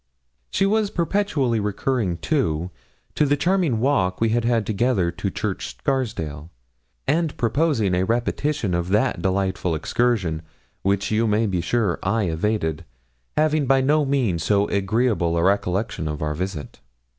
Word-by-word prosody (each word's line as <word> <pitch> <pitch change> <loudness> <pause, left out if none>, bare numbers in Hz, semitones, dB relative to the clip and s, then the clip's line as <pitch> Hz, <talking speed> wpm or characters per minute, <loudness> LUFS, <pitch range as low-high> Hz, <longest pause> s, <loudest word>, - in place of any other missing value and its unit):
She 195 - +1
was 210 +1 +2
perpetually 165 - 0
recurring, 105 -2 -1
too, 90 - -1 0.4
to - - +2
the 145 0 +2
charming 170 - +1
walk 110 -8 +1
we 115 - +2
had 120 +1 +1
had 115 -2 +1
together 105 -4 +1
to - - -3
Church - - -4
Scarsdale, 85 - -2 0.6
and 155 +2 +1
proposing 115 - +1
a 90 - +2
repetition 120 +1 -1
of 85 +1 -1
that 105 -2 +1
delightful 95 -2 0
excursion, 90 -2 0 0.4
which, 100 +1 0
you 110 +1 +2
may 105 +2 +2
be 95 -4 0
sure, 100 +1 0
I 105 +3 +1
evaded, 85 -2 -1 0.5
having 155 -2 +2
by 135 0 +4
no 150 +3 +3
means 130 - 0
so 100 -1 +2
agreeable 100 -4 +1
a 85 - +1
recollection 95 -2 0
of 75 0 -3
our 75 0 -1
visit. 90 -1 -5
110 Hz, 145 wpm, -23 LUFS, 90-135 Hz, 0.6 s, by